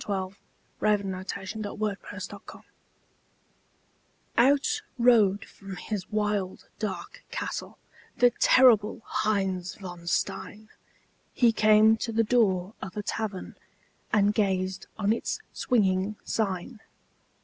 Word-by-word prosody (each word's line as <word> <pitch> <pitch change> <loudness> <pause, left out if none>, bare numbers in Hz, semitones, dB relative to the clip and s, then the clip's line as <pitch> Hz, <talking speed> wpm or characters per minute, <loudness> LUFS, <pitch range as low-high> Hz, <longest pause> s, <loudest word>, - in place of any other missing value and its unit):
_ - - -5
THE - - -5 0.7
LEGEND 205 -2 +2
OF 185 +1 -7
HEINZ 195 +1 -6
VON 210 -1 -4 0.3
STEIN - - -11 1.7
Out 280 - +3 0.2
rode 220 -5 +4
from 195 -1 -10
his 190 +1 -5
wild, 210 -3 -1
dark 210 -4 -5
castle - - -5 0.4
The 245 0 +5
terrible 225 -4 +5
Heinz 195 -4 -1
von 175 -3 -9
Stein; 215 +4 -2 0.7
He 240 -2 +5
came 215 0 +5
to 230 - -3
the 225 +1 +2
door 205 -5 +2
of 190 +1 -7
a 210 - -2
tavern 210 -3 -4 0.6
And 205 -1 +3
gazed 190 -3 0
on 210 0 +2
its 230 - -3
swinging 200 -4 +1
sign. 215 +2 -2
210 Hz, 115 wpm, -27 LUFS, 190-220 Hz, 1.7 s, The